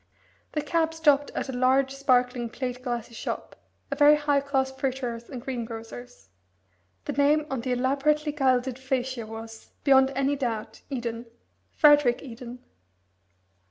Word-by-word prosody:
The 300 - -1
cab 325 +1 0
stopped 290 -3 +3
at - - -2
a - - -4
large, 265 +2 +2
sparkling, 250 -3 +1
plate 250 +1 -5
glassy 240 -2 -4
shop 225 - -5 0.4
a - - 0
very 295 0 +7
high 290 -1 +1
class 270 -1 0
fruiterer's 255 -3 -4
and 260 - -6
greengrocer's. 240 - -7 0.8
The - - -2
name 290 +2 +3
on 265 -3 -2
the 250 +1 -1
elaborately 285 +4 +1
gilded 260 -3 +1
facia 260 -3 -2
was, 225 0 -9
beyond 265 -1 +5
any 275 +1 +1
doubt, 225 -5 -4
Eden 235 -3 -4 0.4
Frederick 290 -5 +4
Eden. 245 -1 -9
260 Hz, 135 wpm, -26 LUFS, 245-280 Hz, 0.8 s, very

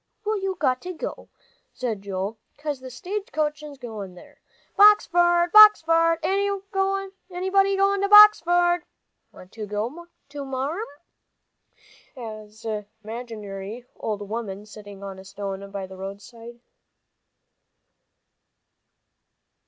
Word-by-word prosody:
"Well, 425 -1 -1
you've 385 -1 -2
got 255 0 0
to," 365 +7 -7 0.5
said 230 -6 -3
Joel, 200 +2 -4 0.2
"'cause 290 -2 -4
the 260 0 -9
stage 385 - -5 0.3
is 295 -2 -10
goin' 215 -7 -8
there. 180 - -17 0.3
Boxford 350 -4 +5
Boxford! 330 -6 +7
Anybody 390 0 -1
goin' 395 0 +2
to 400 - 0
Boxford? 350 -4 +7 0.5
Want 185 - -15
to 215 -2 -7
go, 235 - -4 0.4
Marm?" 275 - -3 1.3
an 215 -2 -7 0.2
imaginary 215 -1 -7
old 205 -2 -4
woman 210 -2 -5
sitting 205 -2 -12
on 195 -1 -7
a - - -11
stone 195 0 -6
by 195 -1 -5
the 190 0 -12
roadside. 225 +5 -10
255 Hz, 100 wpm, -24 LUFS, -, 1.3 s, Boxford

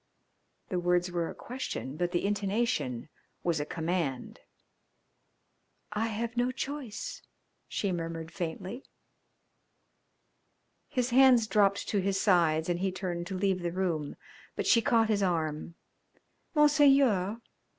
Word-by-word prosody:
The 180 - -1
words 175 0 +1
were 170 -1 -1
a - - -8
question, 240 - -5
but 175 +2 -1
the 175 +2 0
intonation 200 - -1 0.4
was 170 -3 +1
a 145 - -3
command. 160 -6 -2 1.5
"I 215 +2 0
have 230 +2 -3
no 245 +1 +1
choice," 255 -4 -5 0.5
she 200 - -2
murmured 165 -1 -4
faintly. 185 +9 -5 2.1
His 250 -3 -1
hands 255 -2 +6
dropped 200 -2 +2
to 205 - +1
his 195 0 0
sides 165 -5 +3
and 175 -1 0
he 190 0 0
turned 180 -2 -4
to 190 -1 -4
leave 190 -1 +1
the 175 -1 -2
room, 170 -5 -2 0.4
but - - -2
she 230 - +5
caught 230 -3 +3
his 205 -2 +2
arm. 165 -3 -1 0.8
"Monseigneur! 275 -9 +4
190 Hz, 125 wpm, -30 LUFS, 170-230 Hz, 2.1 s, hands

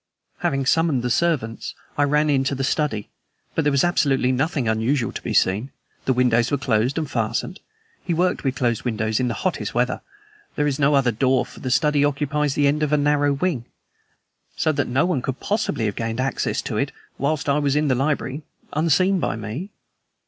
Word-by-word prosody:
"Having 135 -1 0
summoned 155 -3 +2
the 125 - -1
servants, 130 -7 0 0.2
I 145 - +3
ran 150 +2 +2
into 140 -1 +1
the 135 - -2
study. 135 -6 -1 0.4
But 160 - 0
there 145 - +2
was 140 -1 +3
absolutely 140 -7 +2
nothing 135 -1 0
unusual 115 +4 +1
to - - -6
be - - -4
seen. 105 +8 +2 0.4
The 130 - +3
windows 120 -1 +3
were 145 - +1
closed 125 0 0
and 160 -2 -1
fastened. 115 - -2 0.4
He 180 - -3
worked 180 +2 +1
with 135 -2 0
closed 120 -4 0
windows 110 -2 -1
in 125 - +1
the 115 - -2
hottest 140 - -2
weather. 125 +1 0 0.5
There 150 - +1
is 145 -1 -1
no 145 +1 +4
other 130 -3 +3
door, 130 +3 +2
for - - -14
the 130 - -4
study 150 +2 +3
occupies 145 0 0
the 145 - +2
end 145 +2 +2
of 150 -1 0
a 150 - +4
narrow 145 0 +2
wing, 140 -4 -1 0.9
so 155 - +1
that 145 -2 -1
no 130 +7 +2
one 175 -8 0
could 130 0 -4
possibly 210 - -1
have 105 -2 -1
gained 115 +1 -3
access 135 +1 -1
to - - -3
it, - - 0 0.3
whilst 145 +2 -1
I 140 +1 +3
was 140 -1 +1
in 150 0 +2
the 130 - +3
library, 140 +1 -1 0.3
unseen 175 +5 +3
by - - -1
me. 115 - -5
140 Hz, 200 wpm, -22 LUFS, 125-150 Hz, 0.9 s, no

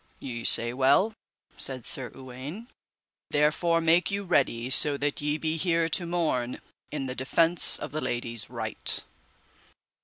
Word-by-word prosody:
Ye 120 -3 -7
say 120 +1 +6
well, 140 - +2 0.4
said 130 -3 -5
Sir 130 -3 -5
Uwaine, 135 - -9 0.6
therefore 155 +3 +1
make 165 +2 +2
you 200 0 -3
ready 130 -8 -1
so 140 +2 +7
that 145 +1 -3
ye 150 +1 -1
be 160 +1 -3
here 165 -1 0
to 170 +2 0
morn 155 -8 -2 0.3
in 145 -3 -5
the 130 - -5
defence 165 +6 +4
of - - -8
the 155 +1 -4
lady's 115 -2 -3
right. - - -4
145 Hz, 145 wpm, -26 LUFS, 130-165 Hz, 0.6 s, so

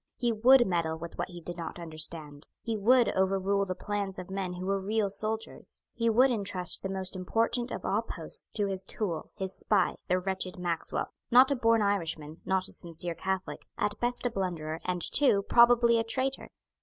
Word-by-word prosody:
He 240 -1 +1
would 240 +3 +6
meddle 170 -3 -1
with 170 +1 -9
what - - -1
he 175 -1 -9
did 175 +1 -6
not 165 -1 -6
understand. 155 -3 -6 0.2
He 230 -1 -2
would 240 +4 +4
overrule 195 +1 +1
the 185 - -3
plans 200 0 -3
of 185 0 -8
men 190 -2 -3
who 180 +1 -6
were 195 0 -1
real 210 0 0
soldiers. 220 +2 -4
He 230 -1 +1
would 250 +4 +5
entrust 195 -5 -1
the 195 - -4
most 190 0 -3
important 230 +6 0
of - - -6
all - - +1
posts - - -4
to 205 - +2
his 190 -1 -2
tool, 180 -5 -3
his 190 0 -4
spy, 205 -1 +1
the 180 - +2
wretched 185 0 -3
Maxwell, 175 -2 -3 0.2
not 255 +3 +7
a - - +3
born 230 -3 +3
Irishman, 165 -6 -2
not 190 0 0
a - - -6
sincere 170 0 -3
Catholic, 190 +2 -4
at 210 0 -1
best 245 +1 0
a 245 - +1
blunderer, 170 -6 -3
and 180 -1 -1
too 230 -9 +3
probably 235 +1 +5
a - - +1
traitor. 260 +4 -2
195 Hz, 195 wpm, -29 LUFS, 180-225 Hz, 0.2 s, not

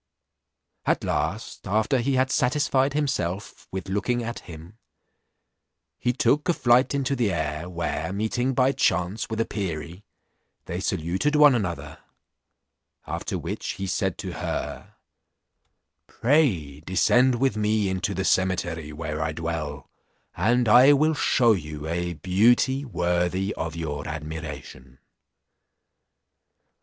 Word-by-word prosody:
At - - +1
last, - - -3
after 110 +7 +1
he 130 +3 0
had 130 +1 +2
satisfied 135 +1 +2
himself 105 - -2
with 95 0 -5
looking 110 +5 -1
at 115 +1 -5
him, 85 +6 -12 1.2
he 125 - +1
tool; 135 +3 +2
a 175 - +4
flight 125 0 +3
into 140 0 0
the 120 -6 +1
air, 80 0 -3
where 85 0 -3
meeting 120 +6 -1
by 130 +1 +4
chance 100 -6 0
with 110 0 -3
a 115 - +2
perie, 85 -2 -5 0.6
they - - -4
saluted 95 - -1
one 150 -2 +7
another; 95 -8 -3 1.1
after - - -4
which - - -4
he 95 - -5
said 95 - -1
to - - -5
her, - - -5 1.1
"Pray 110 - +1
descend 120 +10 +3
with 130 -2 +1
me 105 -1 +1
into 95 +1 -2
the 95 +1 -2
cemetery, 85 -5 0
where 75 0 -4
I 80 0 -1
dwell, 80 -3 -4 0.5
and 120 +6 +2
I 125 +6 +8
will 155 +3 +3
shew 120 -5 +3
you 75 -5 -5
a 85 +1 -2
beauty 120 - +2
worthy 90 -3 0 0.2
your 75 -3 -4
admiration." 75 -5 -7
95 Hz, 125 wpm, -25 LUFS, 85-125 Hz, 1.2 s, I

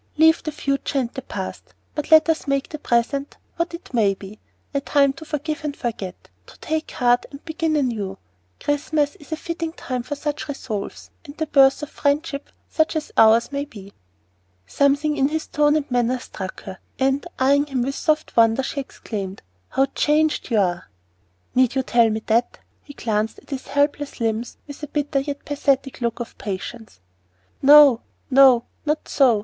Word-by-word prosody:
Leave 320 +1 +5
the 310 - -4
future 275 -1 -2
and 245 -3 0
the 265 - -5
past, - - -7 0.2
but 300 - -4
let 315 0 +7
us 320 -2 0
make 275 0 0
the 305 - -6
present 275 +3 0 0.2
what 335 0 -1
it 335 - -13
may 205 -5 +3
be 200 +2 -11 0.3
a 280 - 0
time 280 -1 +3
to 275 - -11
forgive 305 +1 -4
and 295 -2 -3
forget, 210 -7 -5 0.2
to - - -15
take 315 0 -2
heart 245 0 +2
and 280 0 -12
begin 320 -1 -1
anew. 220 -9 -1 0.4
Christmas 290 0 0
is 295 - -17
a - - 0
fitting 335 0 -4
time 255 -5 -4
for 290 +5 -5
such 295 +1 -4
resolves, 235 -8 -5
and 285 -2 -12
the 315 - -1
birth 275 -1 +4
of 295 - -5
friendship 285 0 -1 0.2
such 315 +1 +1
as 310 -1 -3
ours 225 +3 +5
may 280 0 -2
be." 205 -9 -12 0.7
Something 285 - +2
in 270 -1 +3
his 315 +2 -2
tone 295 0 +2
and 295 -3 -2
manner 245 +1 +2
struck 190 -6 -8
her, 190 -1 -8 0.2
and, 270 +1 +1
eyeing 280 +2 +3
him 260 -4 -1
with 275 +2 -2
soft 310 +2 -1
wonder, 230 +2 +4
she 280 - -3
exclaimed, 200 -7 -6 0.3
"How 270 - +2
changed 305 +1 +1
you 230 - +1
are!" 175 - 0 0.6
"Need 255 0 +3
you 265 - +1
tell 235 -2 +4
me 220 0 -3
that?" 230 +2 +2
And - - -32 0.2
he 285 - -12
glanced 215 -1 -1
at - - -18
his 270 -2 -5
helpless 285 0 0
limbs 225 +1 -2
with 285 0 -10
a 295 - -5
bitter 290 -1 -1
yet 280 +1 -5
pathetic 275 -2 0
look 235 0 -1
of 240 - -6
patience. 205 - -6 0.6
"No, 280 -3 +8 0.3
no 260 -3 +7 0.2
not 305 0 -1
so! 250 -7 +4
275 Hz, 185 wpm, -22 LUFS, 235-295 Hz, 0.7 s, No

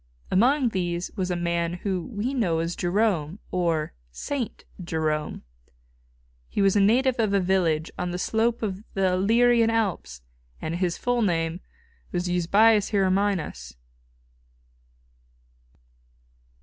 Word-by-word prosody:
Among 250 +6 +3
these 175 -3 -2
was 185 -3 -2
a 180 - 0
man 170 0 -1
whom 190 +4 -4
we 240 +6 -1
know 195 -11 +1
as 165 +1 -2
Jerome, 180 -3 0
or 165 -4 0 0.2
Saint 245 - -5 0.2
Jerome. 155 -2 -2 1.1
He - - -4
was 195 0 +3
a - - +4
native 245 +5 +3
of 210 -3 +2
a - - +4
village 175 -4 +1
on 180 - -1
the 175 - -3
slope 225 +5 0
of 200 -1 -3
the 190 -1 +2
Illyrian 230 +4 +4
Alps, 190 - -2 0.4
and 160 +2 -3
his 175 -2 -1
full 245 -1 0
name 165 -4 0 0.5
was 175 +1 -2
Eusebius 200 +5 +3
Hieronymus. 190 - 0
185 Hz, 125 wpm, -25 LUFS, 170-220 Hz, 1.1 s, a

